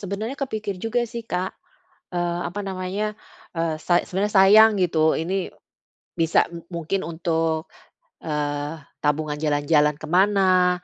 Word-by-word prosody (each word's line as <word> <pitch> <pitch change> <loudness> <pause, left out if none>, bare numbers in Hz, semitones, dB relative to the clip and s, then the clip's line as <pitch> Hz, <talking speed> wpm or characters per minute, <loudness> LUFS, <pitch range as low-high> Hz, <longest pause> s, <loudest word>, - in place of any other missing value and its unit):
sebenernya 210 +6 -4
kepikir 215 -8 -4
juga 235 +3 0
sih 235 0 -6
Kak, 180 +1 -2 0.6
eee, 175 0 -1
apa 200 +4 -5
namanya, 195 +2 -3 0.4
eee, 165 -1 0
sa 175 +1 +3
sebenernya 200 +3 -2
sayang 210 +2 +7
gitu 160 -3 +3
ini, 185 +3 -2 0.7
bisa 165 -1 +3 0.3
mungkin 170 +3 -2
untuk, 160 -1 -1 0.5
eee, 145 0 -3 0.3
tabungan 150 0 0
jalan-jalan 150 0 +2
ke 155 - -9
mana, 185 -1 +3
180 Hz, 120 wpm, -23 LUFS, 160-200 Hz, 0.7 s, sayang